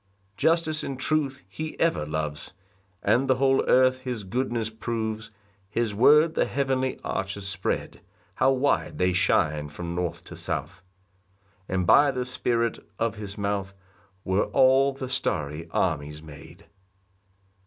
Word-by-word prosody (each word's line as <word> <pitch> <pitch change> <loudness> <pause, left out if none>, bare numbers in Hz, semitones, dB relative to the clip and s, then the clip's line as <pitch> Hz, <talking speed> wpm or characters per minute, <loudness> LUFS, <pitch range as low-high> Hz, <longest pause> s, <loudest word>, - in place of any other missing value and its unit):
2 - - +2
Justice 160 -2 +2
and 135 -2 -5
truth 140 - 0
he 155 +11 -6
ever 165 - +1
loves, 75 +2 -4 0.5
And 135 +3 +3
the 130 - +4
whole 135 +1 +3
earth 130 0 +4
his 125 -4 -4
goodness 115 +2 -2
proves, 110 0 -4 0.4
His 115 0 -1
word 150 +9 +5
the - - +2
heavenly 130 -2 -1
arches 100 0 -3
spread; 100 - -3 0.3
How 130 - +3
wide 135 +2 0
they 90 0 +2
shine 75 -5 +1
from 85 +3 -6
north 90 -1 -3
to - - -10
south! - - -4 0.9
And 95 -1 0
by 145 +10 +6
the 125 -2 -2
Spirit 120 -2 0 0.2
of 115 -2 -1
his 105 -1 -6
mouth 100 -1 -2 0.5
Were 95 +1 +1
all 135 +1 +4
the 135 -1 -6
starry 80 - -2
armies 75 -3 -1
made. 80 +5 -13
115 Hz, 140 wpm, -26 LUFS, 90-130 Hz, 0.9 s, by